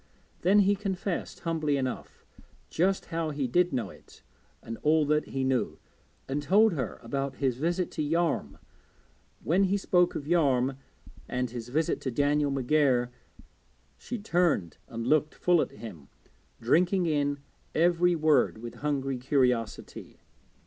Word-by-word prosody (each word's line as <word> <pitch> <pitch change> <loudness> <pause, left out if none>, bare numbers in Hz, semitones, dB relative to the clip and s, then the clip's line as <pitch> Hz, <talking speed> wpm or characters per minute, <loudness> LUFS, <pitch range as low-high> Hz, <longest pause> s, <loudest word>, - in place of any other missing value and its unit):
Then 200 +4 +5
he 200 +1 +3
confessed, 195 -2 -4
humbly 155 -4 0
enough, 130 -2 -5 0.5
just 190 +3 +1
how 165 -1 -1
he 145 -2 -2
did 180 +8 +2
know 120 -7 -2
it, - - -18 0.4
and 115 0 -7
all 155 0 +3
that 150 +1 +1
he 135 0 -3
knew, 130 -1 0 0.5
and 140 +2 -2
told 205 +7 +4
her 130 -8 -4
about 135 -1 -3
his 130 -3 -1
visit 175 +5 -1
to 155 - -4
Yarm. 165 +2 0 0.9
When 185 +5 +3
he 195 +2 +1
spoke 180 -2 +2
of 140 - -4
Yarm 135 -6 +2 0.5
and 125 -1 -2
his 120 -1 -7
visit 155 +5 0
to 130 - -2
Daniel 145 +3 +1
McGair 135 -2 +2 0.9
she 245 - -5
turned 175 - 0
and 115 0 -5
looked 150 +3 +2
full 175 -3 +3
at - - -2
him, 100 -11 -10 0.5
drinking 175 - +2
in 145 -3 0 0.4
every 175 +1 +3
word 155 -7 +3
with 115 +1 -9
hungry 135 -3 -1
curiosity. 125 -4 -1
150 Hz, 140 wpm, -28 LUFS, 130-175 Hz, 0.9 s, Then